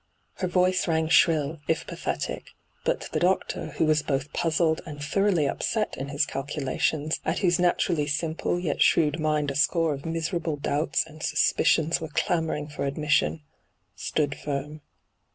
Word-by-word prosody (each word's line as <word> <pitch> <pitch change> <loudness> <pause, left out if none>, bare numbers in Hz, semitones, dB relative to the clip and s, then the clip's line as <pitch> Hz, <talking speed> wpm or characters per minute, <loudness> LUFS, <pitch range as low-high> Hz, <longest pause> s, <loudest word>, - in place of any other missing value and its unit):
Her 185 - -1
voice 185 0 +2
rang 160 -1 +1
shrill, 160 -2 +3
if 165 0 0
pathetic. - - -4 0.3
But - - 0
the - - 0
doctor, 180 -2 0
who 160 - +3
was 155 -1 +3
both 140 0 -2
puzzled 160 -1 +1
and 150 -2 -8
thoroughly 175 +1 +1
upset 215 +9 -1
in 135 - -5
his 145 +1 +1
calculations, 145 +2 -1
at - - -1
whose 175 -1 +3
natur^y 170 -3 +1
simple 160 +3 -1
yet 165 -5 -2
shrewd 155 -1 +4
mind 150 -2 +1
a - - -6
score 160 +2 +2
of 140 0 -7
miserable 165 0 -2
doubts 145 +2 0
^nd 155 0 -13
suspicions 160 +1 +2
were 160 - -4
clamouring 160 -2 -1
for 150 - -5
admission, 150 +2 +1 0.5
stood 145 -2 -1
firm. 150 +1 -5
155 Hz, 155 wpm, -26 LUFS, 145-165 Hz, 0.5 s, shrewd